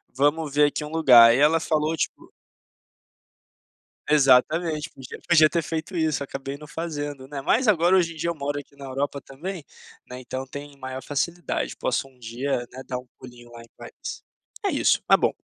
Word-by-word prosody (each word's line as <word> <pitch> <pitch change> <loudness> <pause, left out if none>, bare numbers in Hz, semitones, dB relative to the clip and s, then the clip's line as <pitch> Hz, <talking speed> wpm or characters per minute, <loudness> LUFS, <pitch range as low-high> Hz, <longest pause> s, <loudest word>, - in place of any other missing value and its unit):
vamos 145 +2 +1
ver 150 0 +5
aqui 145 - -3
um 150 - -6
lugar." 125 -8 +8
Aí 120 - +3
ela 150 +4 +4
falou 155 0 0
tipo - - -4 1.8
Exatamente, 150 +3 +3
podia 130 -1 -11
podia 155 -3 +6
ter 170 - 0
feito 160 +3 -5
isso, 155 -3 0
acabei 135 0 -6
não 150 +1 -12
fazendo, 145 -4 -5
né. 140 0 -6
Mas 235 - +2
agora, 180 -2 +4
hoje 170 -3 +2
em - - -15
dia 165 +2 -2
eu 170 - -2
moro 145 0 -3
aqui 140 0 -14
na 140 -1 -10
Europa 140 +2 -3
também, 165 +6 -7 0.4
né, 125 0 -8
então 130 +1 -5
tem 145 +1 -9
maior 130 0 -6
facilidade. 170 +5 -2
Posso - - -1
um 130 -1 -23
dia, 120 +4 -2
né, 130 +1 -9
dar 125 -1 -3
um 125 - -15
pulinho 120 -1 -13
lá 120 0 -11
em 115 - -16
Paris. - - -8 0.4
É - - +3
isso, - - +2
tá - - +7
bom. - - +1
145 Hz, 190 wpm, -24 LUFS, 130-160 Hz, 1.8 s, lugar